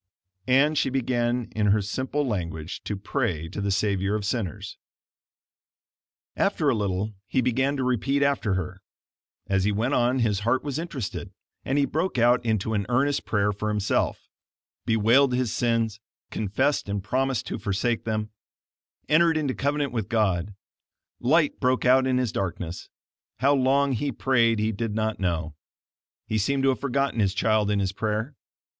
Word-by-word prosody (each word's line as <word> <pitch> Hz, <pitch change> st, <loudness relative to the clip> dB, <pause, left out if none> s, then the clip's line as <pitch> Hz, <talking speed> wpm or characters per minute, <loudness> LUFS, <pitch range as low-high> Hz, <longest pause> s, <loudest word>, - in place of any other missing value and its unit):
And 145 Hz, +4 st, +4 dB
she 135 Hz, -, +1 dB
began 120 Hz, -2 st, -1 dB
in 105 Hz, -1 st, +1 dB
her 105 Hz, +1 st, +4 dB
simple 130 Hz, +8 st, -2 dB
language 85 Hz, -7 st, -4 dB
to 105 Hz, -, -2 dB
pray 100 Hz, -, -2 dB
to 100 Hz, -, -5 dB
the 100 Hz, -, -1 dB
Savior 100 Hz, 0 st, 0 dB
of 105 Hz, -2 st, -3 dB
sinners. 105 Hz, -5 st, -3 dB, 1.6 s
After 150 Hz, -, +1 dB
a -, -, +1 dB
little 100 Hz, 0 st, -2 dB
he 130 Hz, -, 0 dB
began 130 Hz, +3 st, +1 dB
to 130 Hz, -, -1 dB
repeat 135 Hz, +3 st, +1 dB
after 140 Hz, -8 st, +1 dB
her; 95 Hz, +1 st, -4 dB, 0.6 s
as 95 Hz, -1 st, +1 dB
he 105 Hz, -, +2 dB
went 115 Hz, +7 st, 0 dB
on 125 Hz, +1 st, +2 dB
his 110 Hz, -5 st, +1 dB
heart 115 Hz, +5 st, +1 dB
was 145 Hz, 0 st, -3 dB
interested, 150 Hz, -, -5 dB, 0.3 s
and 135 Hz, -, -1 dB
he 140 Hz, -, +4 dB
broke 160 Hz, +4 st, -2 dB
out 120 Hz, +1 st, +4 dB
into 110 Hz, -1 st, 0 dB
an 100 Hz, -2 st, -1 dB
earnest 135 Hz, +3 st, +1 dB
prayer 105 Hz, -1 st, +1 dB
for 105 Hz, +1 st, -3 dB
himself; 105 Hz, -1 st, -1 dB, 0.6 s
bewailed 120 Hz, +4 st, +4 dB
his 125 Hz, -3 st, 0 dB
sins, 115 Hz, -3 st, 0 dB, 0.3 s
confessed 110 Hz, +5 st, 0 dB
and 100 Hz, -1 st, -2 dB
promised 130 Hz, +2 st, 0 dB
to -, -, -4 dB
forsake 110 Hz, +4 st, -1 dB
them; 110 Hz, -1 st, -2 dB, 0.8 s
entered 165 Hz, +1 st, +4 dB
into 145 Hz, -4 st, 0 dB
covenant 145 Hz, +1 st, -1 dB
with 110 Hz, -5 st, -3 dB
God; 100 Hz, -3 st, 0 dB, 0.6 s
light 150 Hz, +4 st, +2 dB
broke 130 Hz, -1 st, +1 dB
out 130 Hz, +1 st, +5 dB
in 130 Hz, -1 st, +2 dB
his 125 Hz, -4 st, 0 dB
darkness; 90 Hz, -2 st, -4 dB, 0.5 s
how 140 Hz, +4 st, +3 dB
long 140 Hz, +1 st, +3 dB
he 135 Hz, +3 st, -1 dB
prayed 115 Hz, -2 st, +2 dB
he 110 Hz, +1 st, 0 dB
did 110 Hz, 0 st, -3 dB
not 110 Hz, 0 st, -1 dB
know; 85 Hz, -4 st, -1 dB, 0.7 s
he 110 Hz, -, -1 dB
seemed 135 Hz, +6 st, 0 dB
to 135 Hz, -, +4 dB
have 130 Hz, -, 0 dB
forgotten 140 Hz, -2 st, -1 dB
his 100 Hz, -2 st, +1 dB
child 110 Hz, -1 st, +2 dB
in 105 Hz, -1 st, +1 dB
his 95 Hz, -1 st, 0 dB
prayer. 110 Hz, +6 st, -2 dB
115 Hz, 165 wpm, -25 LUFS, 105-135 Hz, 1.6 s, out